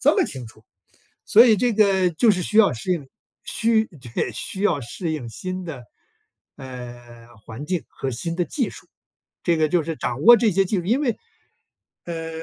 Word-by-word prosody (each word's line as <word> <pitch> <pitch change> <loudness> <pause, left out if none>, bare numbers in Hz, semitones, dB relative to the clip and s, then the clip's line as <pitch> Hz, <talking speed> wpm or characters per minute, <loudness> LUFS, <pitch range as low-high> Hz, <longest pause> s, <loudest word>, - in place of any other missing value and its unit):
这 - - +4
么 385 - +3
清 130 -3 -6
楚， 110 0 -17 0.6
所 230 +4 +7
以 220 -3 +5
这 245 +3 +1
个 195 -4 +3
就 195 +8 +3
是 185 -3 0
需 215 +4 0
要 215 -3 +6
适 125 +10 -2
应， 150 -6 -4 0.4
需 225 -1 +1 0.3
对， - - -1
需 190 - -5
要 175 -9 +2
适 160 +7 -4
应 135 -7 -5
新 185 +9 -6
的， 140 -8 -8 0.7
呃， 120 -3 -10 0.2
环 120 +6 -8
境 180 -1 -2
和 135 - -5
新 165 +8 -4
的 175 - +1
技 255 - -2
术。 - - -13 0.6
这 170 -2 +2
个 155 -1 +2
就 175 +2 +2
是 160 0 -4
掌 125 +3 -3
握 240 +2 +9
这 220 -2 +2
些 195 +2 +3
技 195 +3 -1
术 175 - -4
因 245 +7 +2
为， 250 -6 -1 0.9
呃， 165 -1 -5
175 Hz, 210 characters per minute, -23 LUFS, 135-210 Hz, 0.9 s, 握